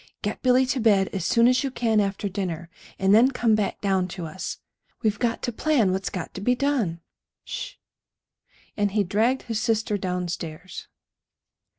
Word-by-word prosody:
Get 205 - -3
Billy 255 0 +4
to 260 +1 -1
bed 205 -4 +3
as 190 -4 -2
soon 235 0 +4
as 255 +2 +3
you 275 - -1
can 230 -4 +1
after 200 0 -1
dinner, 175 -4 -4 0.3
and 195 +1 +3
then 235 +5 +7
come 240 -4 +1
back 210 -2 0
down 190 -2 +1
to 180 -1 -6
us. 160 +4 -5 0.5
We've 210 -2 +1
got 235 -1 -1
to 240 - -1
plan 240 -5 +2
what's 190 +1 -1
got 180 -3 -6
to 190 - -7
be 250 +5 +2
done. 245 -12 0 0.4
Sh - - -6
h!" - - -35 1.0
And 205 -1 +1
he 210 -1 +3
dragged 220 +8 +1
his 225 -3 -2
sister 220 -2 0
downstairs. 180 -2 -4
210 Hz, 180 wpm, -25 LUFS, 190-240 Hz, 1.0 s, then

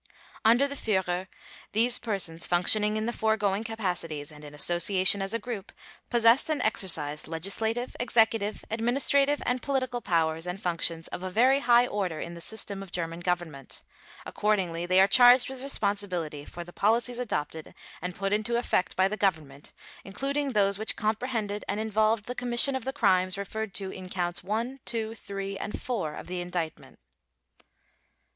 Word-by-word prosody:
Under 240 +5 +5
the 280 - -5
Führer, 190 -7 -1 0.5
these 235 +3 +3
persons 185 -7 -3
functioning 210 +4 +3
in 215 - -1
the 235 - -1
foregoing 215 -2 +1
capacities 175 -9 -4
and 150 0 -13
in 150 0 -10
association 185 +4 +4
as 195 0 -2
a 230 - +1
group, 225 -3 -6 0.4
possessed 235 +4 +4
and 310 - 0
exercised 160 -8 0
legislative, 220 +9 0
executive, 225 -3 +1
administrative, 275 +5 +2
and 250 0 0
political 255 -3 -1
powers 165 -2 0
and 180 +2 -4
functions 170 -3 -1
of - - -6
a 185 - -4
very 255 +8 +4
high 240 -2 +5
order 190 -9 -2
in 170 - -6
the 170 - -10
system 200 0 -5
of 195 -2 -10
German 165 -1 -3
Government. 175 -6 -4 0.4
Accordingly, 180 -5 -1
they 185 +1 +4
are 195 - +7
charged 245 +3 +6
with 265 -1 -7
responsibility 200 - -2
for 175 - -8
the 175 +1 -13
policies 235 +3 +1
adopted 160 -9 -4 0.3
and 180 0 -4
put 195 +1 -1
into 215 +3 0
effect 235 -6 0
by 190 +1 +3
the 210 - -3
Government 155 -8 -2 0.3
including 275 +7 -2
those 200 -1 +2
which 220 - +1
comprehended 215 -1 -2
and 205 - -1
involved 220 0 +1
the 250 - -4
commission 250 +2 +2
of 260 - -4
the 265 - -1
crimes 185 -8 +2
referred 200 +1 -5
to 195 -2 -3
in 185 -1 -9
Counts 175 -1 -3
One, 230 +7 -3
Two, 225 -1 -3
Three, 195 -2 -6
and 210 - -5
Four 190 -12 -3
of - - -8
the 180 0 -4
Indictment. 175 -3 -5
200 Hz, 165 wpm, -28 LUFS, 175-230 Hz, 0.5 s, are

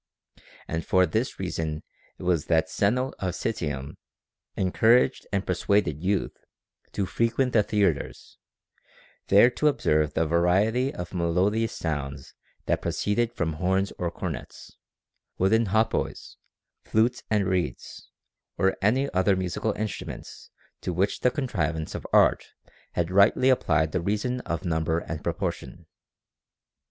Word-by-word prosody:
And 80 +1 -3
for 95 0 +3
this 110 +10 -2
reason 80 -4 -3 0.3
it - - -10
was 85 -4 +1
that 80 -1 +2
Zeno 125 +6 +1
of 90 -2 -2
Citium 75 -10 -3 0.6
encouraged 110 +6 +3
and 100 -1 -1
persuaded 90 -4 0
youth 100 +1 0 0.6
to 100 - -1
frequent 115 +6 0
the 110 - +5
theatres, 100 -8 -1 0.9
there 105 +5 +6
to 150 - +1
observe 75 - +1
the 80 - +2
variety 95 - +2
of 90 +1 -7
melodious 95 +6 +1
sounds 70 -4 -4 0.3
that - - 0
proceeded 115 +3 0
from 85 -8 -2
horns 95 +4 0
or 90 - -1
cornets, 85 -5 -7 0.6
wooden 110 +4 +3
hautboys, 110 +3 -1 0.5
flutes 115 +3 +1
and 105 -2 +2
reeds, 90 -9 -3 0.5
or 95 0 +2
any 125 +8 +2
other 95 +2 +3
musical 95 +4 -2
instruments 110 0 -6 0.3
to 90 - -3
which 95 +4 0
the 125 - +3
contrivance 85 - -2
of - - -6
art - - +4 0.5
had 85 0 -1
rightly 100 +7 +5
applied 80 - +2
the 90 - -1
reason 105 +7 -1
of 85 +3 -3
number 80 -1 0
and 80 -2 -5
proportion. - - -4
95 Hz, 125 wpm, -26 LUFS, 80-110 Hz, 0.9 s, there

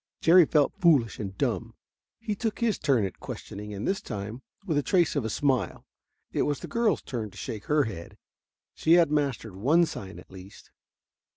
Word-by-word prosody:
Jerry 170 +1 +7
felt 150 -3 +3
foolish 145 - +3
and 95 -2 -5
dumb. - - -2 0.4
He 225 -2 -3
took 220 +1 -3
his 230 -3 0
turn 135 -8 +2
at 95 - -7
questioning, 105 +1 -7
and 100 0 -4
this 190 0 0
time, 105 +4 -6 0.2
with 165 -6 -1
a - - +1
trace 170 +4 +2
of 140 - 0
a 110 - -2
smile, 135 +2 0 0.5
it - - 0
was 145 -2 -1
the - - -6
girl's 230 -6 +1
turn 115 -5 -4
to - - -16
shake 110 -6 -6
her 150 -1 +3
head. 85 -9 -7 0.6
She 160 - +2
had 170 -3 +5
mastered 135 -9 -1
one 150 - +3
sign 95 -10 -8
at - - -14
least. 95 +1 -13
140 Hz, 190 wpm, -27 LUFS, 105-170 Hz, 0.6 s, Jerry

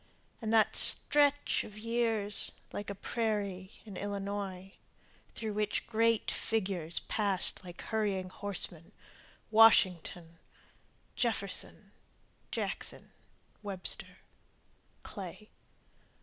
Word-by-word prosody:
And 220 -1 -2
that 220 -2 +4
stretch 290 -1 +5
of 210 - -11
years 225 -2 +2 0.2
like 205 - -5
a 200 - -4
prairie 200 -4 -2 0.2
in 200 -4 -9
Illinois 200 -2 -5 0.6
Through 220 -2 -4
which 210 0 -1
great 230 0 +1
figures 185 -7 -2
passed 200 -2 +1
like 175 -1 -10
hurrying 200 -4 -1
horsemen, 185 -2 -3 0.6
Washington, 180 -6 +4 0.8
Jefferson, 220 -5 -2 0.6
Jackson, - - -5 0.5
Webster, 195 -3 -2 0.9
Clay. 200 +2 -9
205 Hz, 85 wpm, -32 LUFS, 185-220 Hz, 0.9 s, stretch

